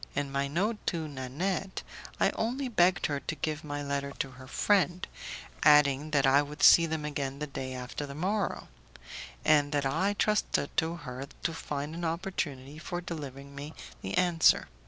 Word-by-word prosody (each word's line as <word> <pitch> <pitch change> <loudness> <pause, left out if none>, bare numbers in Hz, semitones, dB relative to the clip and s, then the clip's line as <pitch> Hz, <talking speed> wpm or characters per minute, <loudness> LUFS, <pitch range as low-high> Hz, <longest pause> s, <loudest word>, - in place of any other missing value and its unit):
In 145 -1 -1
my 140 0 0
note 195 +10 0
to 165 -3 -1
Nanette, 150 +8 -3 0.4
I - - +4
only 255 +4 -2
begged 185 -6 +3
her 145 -2 0
to 160 - -4
give 150 +1 -3
my 145 -1 -4
letter 140 0 -2
to 135 - -2
her 130 +1 -12
friend, 185 +3 +2 0.5
adding 150 0 +5
that 145 -3 +3
I 135 +2 +6
would 145 +1 -6
see 165 -1 +8
them 160 -1 -3
again 140 -2 -3
the 150 - -3
day 130 -2 -5
after 125 +3 -5
the 140 - -8
morrow, 195 +5 -1 0.8
and 145 -2 +4
that 145 -1 +1
I 165 +9 +1
trusted 210 -9 +1
to 165 +1 +1
her 135 -4 -7 0.2
to 165 - 0
find 145 -1 -4
an 170 +1 -5
opportunity 160 -5 -3
for 175 +2 -4
delivering 140 -5 -7
me 145 +3 -8 0.3
the - - -3
answer. 175 -3 +4
150 Hz, 175 wpm, -30 LUFS, 140-175 Hz, 0.8 s, see